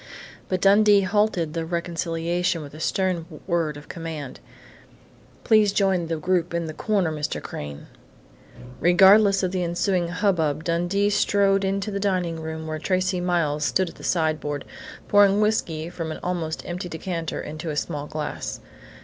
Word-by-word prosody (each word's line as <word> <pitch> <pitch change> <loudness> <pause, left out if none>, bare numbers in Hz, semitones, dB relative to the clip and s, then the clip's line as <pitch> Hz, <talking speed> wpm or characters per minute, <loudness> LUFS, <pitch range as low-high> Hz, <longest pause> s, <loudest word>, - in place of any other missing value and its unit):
But 185 -1 -1
Dundee 205 +1 +6
halted 190 -5 +1
the 165 -1 -2
reconciliation 170 0 -1
with 145 - -11
a 155 - -10
stern 180 -1 -1 0.2
word 165 -4 0
of 145 - -12
command. 160 -5 -6 1.0
"Please 215 -3 +4
join 190 -4 +1
the 165 0 -2
group 175 +1 0
in 170 -1 -1
the 155 - -5
corner, 195 -3 0
Mr. 150 -1 -3
Crain!" 75 -1 -7 0.9
Regardless 195 +3 +6
of 185 - 0
the 185 -1 -1
ensuing 175 +1 0
hubbub 170 -5 0
Dundee 175 +5 +1
strode 200 -1 +2
into 195 +2 -1
the 200 - -2
dining 180 -4 -1
room, 160 0 -5
where 155 0 -4
Tracey 185 +1 0
Miles 165 -4 0
stood 185 +4 +1
at - - -14
the - - -13
sideboard, 155 -4 -1 0.4
pouring 205 0 +5
whiskey 175 -7 0
from 165 -2 -5
an - - -6
almost 170 -3 -3
empty 180 +1 -5
decanter 165 0 -4
into 155 +2 -6
a 150 - -3
small 150 -1 -3
glass. 150 - -5
175 Hz, 155 wpm, -24 LUFS, 160-195 Hz, 1.0 s, Dundee